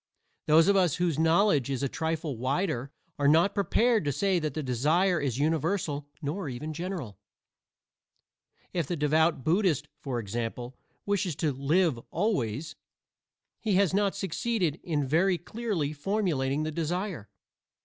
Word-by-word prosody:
Those 160 Hz, +3 st, +6 dB
of 200 Hz, -, +4 dB
us 180 Hz, -6 st, +3 dB
whose 170 Hz, -4 st, 0 dB
knowledge 160 Hz, -, +3 dB
is 135 Hz, 0 st, -2 dB
a -, -, +2 dB
trifle 160 Hz, 0 st, -2 dB
wider 135 Hz, -, -1 dB, 0.3 s
are 140 Hz, -, +3 dB
not 165 Hz, +7 st, +4 dB
prepared 225 Hz, +2 st, +2 dB
to 145 Hz, -, +1 dB
say 185 Hz, +6 st, +1 dB
that 155 Hz, -4 st, -3 dB
the 155 Hz, -, -2 dB
desire 155 Hz, +9 st, +2 dB
is 130 Hz, -4 st, -1 dB
universal 150 Hz, 0 st, 0 dB, 0.2 s
nor 155 Hz, +3 st, -3 dB
even 150 Hz, +5 st, -5 dB
general. 170 Hz, -, -5 dB, 1.5 s
If 170 Hz, -6 st, -1 dB
the 175 Hz, -, -1 dB
devout 155 Hz, -1 st, +2 dB
Buddhist, 160 Hz, -, +1 dB
for 135 Hz, -5 st, -3 dB
example, 120 Hz, +3 st, -4 dB, 0.3 s
wishes 200 Hz, -5 st, 0 dB
to 155 Hz, -1 st, 0 dB
"live 145 Hz, +1 st, +1 dB
always," 155 Hz, -, -1 dB, 0.8 s
he 210 Hz, -4 st, 0 dB
has 190 Hz, -2 st, +3 dB
not 200 Hz, 0 st, +1 dB
succeeded 195 Hz, -3 st, -1 dB
in 150 Hz, -5 st, -1 dB
very 175 Hz, +7 st, +2 dB
clearly 185 Hz, -7 st, -3 dB
formulating 150 Hz, -5 st, 0 dB
the 155 Hz, -, -2 dB
desire. 170 Hz, -, -3 dB
160 Hz, 140 wpm, -28 LUFS, 140-185 Hz, 1.5 s, Those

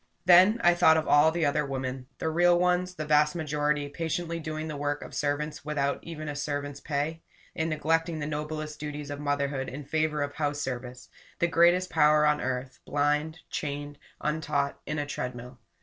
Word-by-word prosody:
Then 185 Hz, +6 st, +7 dB
I 175 Hz, -, +6 dB
thought 160 Hz, -2 st, +5 dB
of 160 Hz, -, -1 dB
all 145 Hz, +2 st, +6 dB
the 165 Hz, 0 st, 0 dB
other 150 Hz, +1 st, +1 dB
women, 130 Hz, -2 st, -4 dB
the 160 Hz, -, -2 dB
real 175 Hz, +1 st, +4 dB
ones, 180 Hz, +1 st, +1 dB
the 155 Hz, -, -4 dB
vast 150 Hz, +1 st, +3 dB
majority, 150 Hz, -2 st, 0 dB
patiently 165 Hz, +2 st, -3 dB
doing 155 Hz, 0 st, -4 dB
the 155 Hz, -, -5 dB
work 145 Hz, 0 st, -2 dB
of -, -, -11 dB
servants 150 Hz, +1 st, -2 dB
without 140 Hz, -2 st, -1 dB
even 155 Hz, -2 st, -7 dB
a 145 Hz, -, -4 dB
servant's 145 Hz, -1 st, -3 dB
pay 150 Hz, +3 st, -2 dB, 0.3 s
and 160 Hz, 0 st, -1 dB
neglecting 165 Hz, +2 st, 0 dB
the 150 Hz, -, -3 dB
noblest 150 Hz, 0 st, -4 dB
duties 150 Hz, -1 st, -5 dB
of 145 Hz, -, -5 dB
motherhood 140 Hz, -2 st, -1 dB
in 140 Hz, +2 st, -7 dB
favor 155 Hz, 0 st, 0 dB
of 145 Hz, 0 st, -4 dB
house 145 Hz, -1 st, -2 dB
service; 125 Hz, -2 st, -5 dB, 0.3 s
the -, -, +2 dB
greatest 175 Hz, +2 st, +3 dB
power 150 Hz, -1 st, +5 dB
on 150 Hz, 0 st, +2 dB
earth, 130 Hz, 0 st, -3 dB
blind, 150 Hz, +3 st, 0 dB
chained, 145 Hz, 0 st, -4 dB, 0.2 s
untaught, 150 Hz, -2 st, -1 dB
in 155 Hz, -, -2 dB
a 145 Hz, -, -1 dB
treadmill. 125 Hz, -3 st, -6 dB
150 Hz, 180 wpm, -28 LUFS, 145-160 Hz, 0.3 s, Then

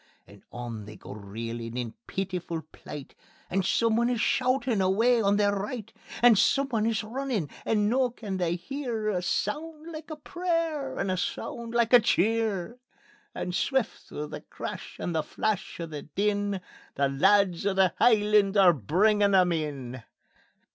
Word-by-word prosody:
And 100 Hz, 0 st, -16 dB
on 120 Hz, -3 st, -6 dB
they 105 Hz, +1 st, -10 dB
go -, -, -10 dB
reelin' 115 Hz, +3 st, -6 dB
in 120 Hz, -2 st, -3 dB
peetifu' 180 Hz, -4 st, -3 dB
plight, 145 Hz, -2 st, -9 dB, 0.4 s
And 195 Hz, +1 st, +1 dB
someone 230 Hz, +4 st, +2 dB
is 245 Hz, -2 st, 0 dB
shoutin' 255 Hz, -3 st, +1 dB
away 225 Hz, +6 st, +3 dB
on 200 Hz, -1 st, +3 dB
their 205 Hz, -1 st, +2 dB
right; 210 Hz, +2 st, -5 dB, 0.3 s
And 235 Hz, -4 st, +7 dB
someone 235 Hz, -2 st, +2 dB
is 225 Hz, -1 st, 0 dB
runnin', 230 Hz, -, -2 dB, 0.2 s
and 210 Hz, -2 st, +2 dB
noo 250 Hz, +2 st, +2 dB
they 205 Hz, -4 st, -4 dB
can 175 Hz, -1 st, 0 dB
hear 235 Hz, +1 st, -3 dB
A 185 Hz, -4 st, 0 dB
sound 310 Hz, -, -3 dB
like 310 Hz, 0 st, -8 dB
a 310 Hz, -, -4 dB
prayer 320 Hz, -4 st, -2 dB
and 195 Hz, -, -1 dB
a 185 Hz, -, 0 dB
sound 235 Hz, +5 st, -4 dB
like 235 Hz, 0 st, +2 dB
a 245 Hz, -, +11 dB
cheer; 220 Hz, 0 st, +1 dB, 0.6 s
And 180 Hz, -, -3 dB
swift 265 Hz, +4 st, -1 dB
through 150 Hz, 0 st, -6 dB
the -, -, -7 dB
crash -, -, -7 dB
and 175 Hz, -, -2 dB
the 160 Hz, -, +1 dB
flash 215 Hz, +3 st, -2 dB
and 165 Hz, -2 st, -6 dB
the 145 Hz, -, -4 dB
din, 200 Hz, +3 st, -1 dB, 0.3 s
The 140 Hz, 0 st, +2 dB
lads 190 Hz, +6 st, +3 dB
o' 195 Hz, -, +1 dB
the 190 Hz, -2 st, +4 dB
Hielands 210 Hz, -3 st, +4 dB
are 185 Hz, -3 st, +7 dB
bringin' 200 Hz, -, +2 dB
them 180 Hz, -2 st, +5 dB
in. 140 Hz, -6 st, -3 dB
205 Hz, 160 wpm, -28 LUFS, 170-235 Hz, 0.6 s, a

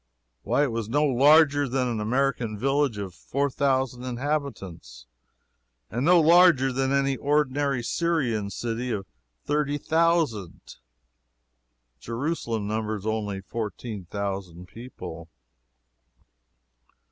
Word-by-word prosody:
Why, 145 Hz, -, +1 dB
it 140 Hz, -, 0 dB
was 115 Hz, -2 st, -3 dB
no 145 Hz, +5 st, +2 dB
larger 145 Hz, +1 st, +5 dB
than 130 Hz, 0 st, 0 dB
an 115 Hz, -3 st, -2 dB
American 120 Hz, -1 st, 0 dB
village 135 Hz, 0 st, +1 dB
of 100 Hz, -3 st, -5 dB
four 140 Hz, +10 st, -2 dB
thousand 130 Hz, -3 st, 0 dB
inhabitants, 120 Hz, -, -4 dB, 0.9 s
and 120 Hz, +3 st, -2 dB
no 175 Hz, +3 st, +6 dB
larger 165 Hz, -5 st, +5 dB
than 135 Hz, +1 st, 0 dB
an 140 Hz, 0 st, +2 dB
ordinary 140 Hz, -3 st, +1 dB
Syrian 125 Hz, -10 st, 0 dB
city 120 Hz, +3 st, -3 dB
of 105 Hz, -4 st, -3 dB, 0.4 s
thirty 145 Hz, -1 st, 0 dB
thousand. 160 Hz, -, 0 dB, 1.2 s
Jerusalem 115 Hz, -, -3 dB
numbers 110 Hz, -1 st, -3 dB
only 105 Hz, -3 st, -2 dB
fourteen 105 Hz, -1 st, -6 dB
thousand 95 Hz, -2 st, -5 dB
people. 90 Hz, -9 st, -9 dB
125 Hz, 105 wpm, -26 LUFS, 105-145 Hz, 1.2 s, no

